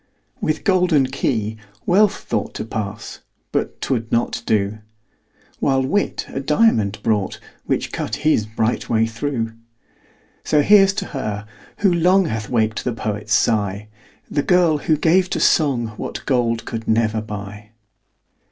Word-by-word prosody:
With 155 Hz, -, -1 dB
golden 180 Hz, -8 st, +3 dB
key 110 Hz, -5 st, -2 dB, 0.3 s
Wealth 200 Hz, +3 st, +3 dB
thought -, -, -3 dB
To -, -, -4 dB
pass 105 Hz, -1 st, -5 dB, 0.3 s
but -, -, -2 dB
'twould 115 Hz, -4 st, -2 dB
not 120 Hz, +1 st, 0 dB
do: 105 Hz, 0 st, +1 dB, 0.8 s
While 135 Hz, -1 st, +2 dB
Wit 200 Hz, +10 st, -1 dB
a -, -, -4 dB
diamond 135 Hz, -, +2 dB
brought, 105 Hz, -3 st, 0 dB, 0.3 s
Which -, -, -1 dB
cut -, -, -3 dB
his 150 Hz, -9 st, +1 dB
bright 110 Hz, +1 st, -1 dB
way 110 Hz, -1 st, +3 dB
through. 115 Hz, 0 st, -3 dB, 0.9 s
So 150 Hz, -1 st, +3 dB
here's 195 Hz, +1 st, +6 dB
to -, -, -3 dB
her, 105 Hz, -6 st, -3 dB, 0.4 s
who 185 Hz, -, +5 dB
long 180 Hz, +3 st, +4 dB
Hath 110 Hz, -7 st, -3 dB
waked 110 Hz, -3 st, 0 dB
the 125 Hz, -, -1 dB
poet's 105 Hz, -1 st, -2 dB
sigh, 105 Hz, -2 st, 0 dB, 0.4 s
The 145 Hz, -, 0 dB
girl, 170 Hz, -2 st, +3 dB
who 155 Hz, +1 st, +1 dB
gave 180 Hz, +4 st, +3 dB
to -, -, -1 dB
song 130 Hz, -7 st, +2 dB
What -, -, -6 dB
gold 115 Hz, -4 st, 0 dB
could 115 Hz, 0 st, -5 dB
never 110 Hz, -1 st, +1 dB
buy. 105 Hz, 0 st, -8 dB
115 Hz, 145 wpm, -20 LUFS, 110-155 Hz, 0.9 s, here's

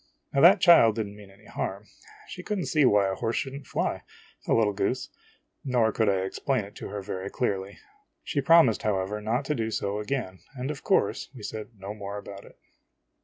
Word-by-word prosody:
Now 140 Hz, -, +3 dB
that 185 Hz, +4 st, +8 dB
child 165 Hz, -, +6 dB
did 110 Hz, -2 st, -1 dB
n't 100 Hz, 0 st, -10 dB
mean 105 Hz, -1 st, -13 dB
any 100 Hz, +2 st, -20 dB
harm; 100 Hz, 0 st, -4 dB, 0.4 s
she 180 Hz, -, -8 dB
could 210 Hz, +3 st, -3 dB
n't 180 Hz, -, -3 dB
see 150 Hz, -3 st, +3 dB
why 105 Hz, -4 st, +4 dB
a 95 Hz, -, -1 dB
horse 115 Hz, +4 st, -2 dB
should 135 Hz, -, -2 dB
n't 140 Hz, -, -9 dB
fly, -, -, -2 dB, 0.5 s
the -, -, +3 dB
little 110 Hz, -3 st, +2 dB
goose! -, -, -1 dB, 0.5 s
nor 120 Hz, -5 st, +2 dB
could 110 Hz, 0 st, +1 dB
I 95 Hz, -1 st, +1 dB
explain 125 Hz, +3 st, -1 dB
it 100 Hz, -, -13 dB
to -, -, -6 dB
her 100 Hz, 0 st, -6 dB
very 95 Hz, -1 st, -5 dB
clearly. 100 Hz, -5 st, -2 dB, 0.5 s
She 140 Hz, -, -1 dB
promised, 150 Hz, -5 st, +5 dB
however, 105 Hz, 0 st, -1 dB
not 120 Hz, +6 st, -1 dB
to 150 Hz, -, 0 dB
do 115 Hz, -5 st, -2 dB
so 100 Hz, -1 st, -2 dB
again, 105 Hz, -4 st, -3 dB, 0.2 s
and 130 Hz, +3 st, -3 dB
of 145 Hz, -, -8 dB
course -, -, +1 dB
\ve -, -, -10 dB
said 110 Hz, -1 st, -5 dB
no 100 Hz, +2 st, -6 dB
more 100 Hz, -1 st, -6 dB
about 100 Hz, -1 st, -9 dB
it. -, -, -17 dB
110 Hz, 215 wpm, -27 LUFS, 100-135 Hz, 0.5 s, that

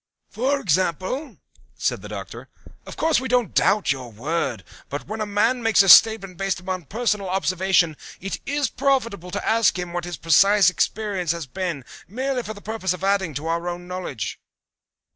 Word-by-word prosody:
"For 260 Hz, +7 st, 0 dB
example?" 185 Hz, -, -1 dB, 0.4 s
said -, -, -1 dB
the -, -, -9 dB
Doctor. -, -, -8 dB, 0.4 s
"Of -, -, -9 dB
course 320 Hz, -4 st, +2 dB
we 260 Hz, -, -4 dB
don't 245 Hz, -5 st, +1 dB
doubt 205 Hz, -8 st, +3 dB
your 130 Hz, -3 st, -4 dB
word, 125 Hz, -, -2 dB, 0.3 s
but 145 Hz, -, -5 dB
when 220 Hz, +1 st, -5 dB
a 215 Hz, -, -2 dB
man 225 Hz, +5 st, +1 dB
makes 225 Hz, -3 st, +4 dB
a 195 Hz, -, +1 dB
statement 195 Hz, -1 st, +7 dB
based 195 Hz, -2 st, -1 dB
upon 185 Hz, -2 st, -5 dB
personal 210 Hz, -, -1 dB
observation 185 Hz, -3 st, +1 dB, 0.2 s
it 195 Hz, +2 st, -5 dB
is 285 Hz, 0 st, 0 dB
profitable 230 Hz, -9 st, -1 dB
to -, -, -4 dB
ask 225 Hz, -3 st, +3 dB
him 180 Hz, -1 st, -5 dB
what 175 Hz, 0 st, -3 dB
his 175 Hz, -2 st, -6 dB
precise 195 Hz, +4 st, +5 dB
experience 195 Hz, -4 st, -1 dB
has 170 Hz, -2 st, -5 dB
been 170 Hz, -2 st, -4 dB, 0.2 s
merely 255 Hz, +5 st, -2 dB
for 215 Hz, -2 st, -7 dB
the 205 Hz, -, -12 dB
purpose 205 Hz, -4 st, -2 dB
of 180 Hz, -, -9 dB
adding 195 Hz, -6 st, +1 dB
to 145 Hz, +4 st, -4 dB
our 170 Hz, +1 st, -1 dB
own 175 Hz, 0 st, -7 dB
knowledge." 180 Hz, -, -5 dB
190 Hz, 180 wpm, -23 LUFS, 175-220 Hz, 0.4 s, statement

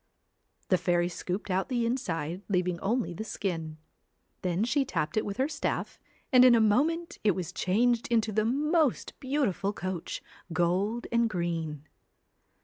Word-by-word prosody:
The 185 Hz, -, +4 dB
fairy 175 Hz, -1 st, +1 dB
scooped 185 Hz, +3 st, -4 dB
out 190 Hz, +6 st, 0 dB
the 240 Hz, -3 st, +1 dB
inside, 180 Hz, -, -2 dB
leaving 180 Hz, -2 st, 0 dB
only 220 Hz, 0 st, 0 dB
the 195 Hz, -, -5 dB
skin. 165 Hz, -8 st, -4 dB, 0.6 s
Then 180 Hz, +2 st, 0 dB
she 275 Hz, +4 st, +2 dB
tapped 210 Hz, -, -2 dB
it 215 Hz, -, +2 dB
with 200 Hz, -1 st, -4 dB
her 265 Hz, -, +2 dB
staff, 295 Hz, -2 st, -3 dB, 0.3 s
and 255 Hz, -1 st, +8 dB
in 250 Hz, -2 st, +8 dB
a -, -, +5 dB
moment 300 Hz, +11 st, +1 dB
it 205 Hz, -4 st, +3 dB
was 180 Hz, -1 st, -4 dB
changed 230 Hz, +7 st, +2 dB
into 225 Hz, -2 st, +1 dB
the 215 Hz, +1 st, +1 dB
most 295 Hz, +4 st, +1 dB
beautiful 260 Hz, -, 0 dB
coach, 185 Hz, -4 st, -4 dB, 0.3 s
gold 185 Hz, +8 st, 0 dB
and 235 Hz, 0 st, +3 dB
green. 165 Hz, -5 st, -3 dB
205 Hz, 150 wpm, -29 LUFS, 175-245 Hz, 0.6 s, and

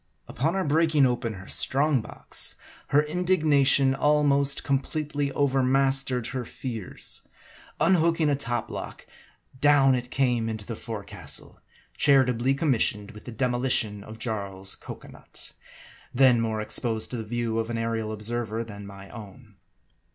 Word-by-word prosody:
Upon 160 Hz, +8 st, -1 dB
our 190 Hz, -, 0 dB
breaking 155 Hz, -1 st, +3 dB
open 120 Hz, -3 st, -1 dB
her 95 Hz, 0 st, -11 dB
strong 140 Hz, -1 st, +2 dB
box, -, -, -1 dB, 0.3 s
her 145 Hz, +1 st, +4 dB
indignation 150 Hz, -5 st, +3 dB
almost 140 Hz, -1 st, +2 dB
completely 145 Hz, +1 st, -1 dB
overmastered 135 Hz, -2 st, +1 dB
her 130 Hz, -1 st, -2 dB
fears. 115 Hz, -4 st, -5 dB, 0.6 s
Unhooking 165 Hz, -3 st, +3 dB
a 145 Hz, -, +3 dB
top 120 Hz, -4 st, -3 dB
block, -, -, -7 dB, 0.5 s
down 140 Hz, -2 st, +5 dB
it 125 Hz, -1 st, -2 dB
came 120 Hz, -4 st, +1 dB
into 110 Hz, -2 st, -5 dB
the 115 Hz, -, -5 dB
forecastle, 105 Hz, -3 st, -5 dB, 0.4 s
charitably 130 Hz, -2 st, +3 dB
com 150 Hz, +1 st, +1 dB
missioned 105 Hz, -3 st, 0 dB
with 105 Hz, -2 st, -13 dB
the 125 Hz, -, -7 dB
demolition 120 Hz, -4 st, 0 dB
of 110 Hz, +1 st, -10 dB
Jarl's 100 Hz, -4 st, -2 dB
cocoa -, -, -10 dB
nut, -, -, -9 dB, 0.6 s
then 125 Hz, -2 st, +5 dB
more 110 Hz, -1 st, -1 dB
exposed 110 Hz, +1 st, +1 dB
to 125 Hz, -, -3 dB
the 110 Hz, -, -4 dB
view 115 Hz, 0 st, -2 dB
of 115 Hz, 0 st, -2 dB
an 115 Hz, -, -2 dB
aerial 115 Hz, -1 st, -2 dB
observer 110 Hz, +1 st, -2 dB
than 105 Hz, -3 st, -10 dB
my 100 Hz, 0 st, -11 dB
own. 105 Hz, -1 st, -12 dB
125 Hz, 140 wpm, -26 LUFS, 110-140 Hz, 0.6 s, down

